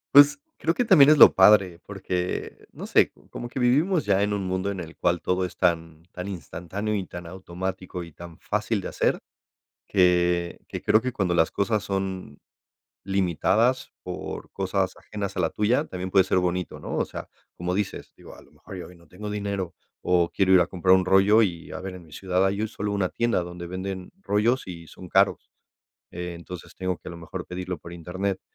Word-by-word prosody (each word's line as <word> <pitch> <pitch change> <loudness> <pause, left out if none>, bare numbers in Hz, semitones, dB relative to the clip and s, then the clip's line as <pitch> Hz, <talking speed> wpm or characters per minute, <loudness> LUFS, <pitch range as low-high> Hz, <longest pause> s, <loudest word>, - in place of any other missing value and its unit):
Pues 145 - +8 0.2
creo 165 +1 +1
que 245 - +1
también 150 -9 +7
es 155 - +6
lo - - +9
padre, 95 -3 +5
porque 90 -3 -4
no - - -8
sé, - - +3 0.2
como 120 - -6
que 130 - -5
vivimos 150 +8 +2
ya 100 -1 +3
en 105 - +1
un 100 -2 -2
mundo 95 +1 -1
en 100 -2 -4
el 80 -1 -8
cual 85 -1 0
todo 90 0 0
es 90 - -5
tan 85 -3 0
tan 90 +1 -6
instantáneo 95 +4 -5
y 95 -3 -2
tan 85 0 -8
automático 90 +1 -5
y 85 - -11
tan 85 0 -11
fácil 105 +1 -1
de 95 - -5
hacer - - 0 0.7
que, 90 -2 +2
que - - -5
creo 110 +1 +4
que 130 +2 -2
cuando 95 -6 0
las 80 -1 +3
cosas 105 +1 0
son 95 -6 -4 0.6
limitadas 100 +6 +1
por - - -6
cosas 95 -1 -1
ajenas 100 -2 -6
a - - 0
la - - +1
tuya 115 +7 +1
también 95 -9 -6
puede 95 -2 +6
ser 95 - +1
bonito, 90 -1 -1
¿no? - - -5
O - - +1
sea, - - -7 0.3
como 90 +1 -2
dices, 100 0 -3
digo, - - -13
a - - -14
lo - - -21
mejor 95 - -11
yo 90 - -7
hoy 90 - -14
no 85 -2 -21
tengo 105 +3 -7
dinero 100 -4 -3 0.3
o 85 -1 +2
quiero 95 -1 +3
ir 90 - +7
a 85 - +1
comprar 95 0 +4
un 95 - +2
rollo 95 +4 +5
y 85 -6 -2
a - - -6
ver, 95 0 -6
en 90 -2 -12
mi 80 - -16
ciudad 95 +2 0
hay 100 +3 0
solo 105 0 -3
una 100 -3 0
tienda 120 -5 0
donde 85 0 -8
venden 95 +1 -5
rollos 115 - +1
y 85 -3 -9
son 90 -2 -12
caros. - - +2 0.6
Entonces 90 0 -8
tengo 95 -1 -2
que - - -11
a - - -7
lo 85 - -9
mejor 85 +2 -7
pedirlo 90 0 -4
por 85 +2 -11
internet, 95 +3 -3
95 Hz, 205 wpm, -25 LUFS, 90-100 Hz, 0.7 s, lo